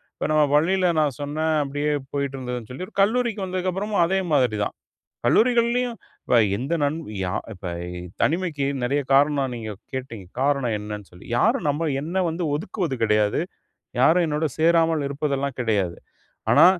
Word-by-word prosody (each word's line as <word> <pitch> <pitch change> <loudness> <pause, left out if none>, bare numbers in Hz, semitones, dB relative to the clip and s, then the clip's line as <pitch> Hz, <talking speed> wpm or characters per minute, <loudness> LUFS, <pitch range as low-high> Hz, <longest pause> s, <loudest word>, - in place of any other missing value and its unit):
இப்ப - - -2
நம்ம 155 -1 +5
பள்ளியில 180 +4 +3
நான் 145 -5 +1
சொன்னேன் 155 +2 0
அப்டியே 145 +2 -1 0.2
போயிட்டிருந்ததுன்னு 130 -5 -3
சொல்லி. 130 +9 -5
ஒரு - - -19
கல்லூரிக்கு 220 -1 +1
வந்ததுக்கப்புறமும் 185 +1 0
அதே 190 +2 +1
மாதிரி 125 -6 +3
தான். - - -4 0.5
கல்லூரிகள்லயும் 240 0 +3 0.3
இப்ப 125 - +3 0.2
எந்த 140 +9 -2
நண் 145 +2 +1 0.2
யா 90 -1 -2 0.2
இப்ப 90 - -9 0.6
தனிமைக்கு 160 -4 +1 0.2
நெறைய 140 +4 +1
காரணம் 140 -1 +3
நீங்க 110 -2 -5 0.2
கேட்டீங்க. 115 -7 -6
காரணம் 135 -5 +1
என்னன்னு 105 -1 -7
சொல்லி. 90 +2 -15
யாரும் 155 - +2
நம்ம 155 +3 0
என்னை 175 +5 -1
வந்து 170 +2 -3
ஒதுக்குவது 170 -5 -3
கெடையாது, 105 +1 +2 0.6
யாரும் 165 +6 +5
என்னோடு 155 +1 0
சேராமல் 165 -2 +3
இருப்பதெல்லாம் 140 -1 -2
கெடையாது. 100 -7 0 0.5
ஆனா, - - +8
145 Hz, 145 wpm, -24 LUFS, 125-175 Hz, 0.6 s, ஆனா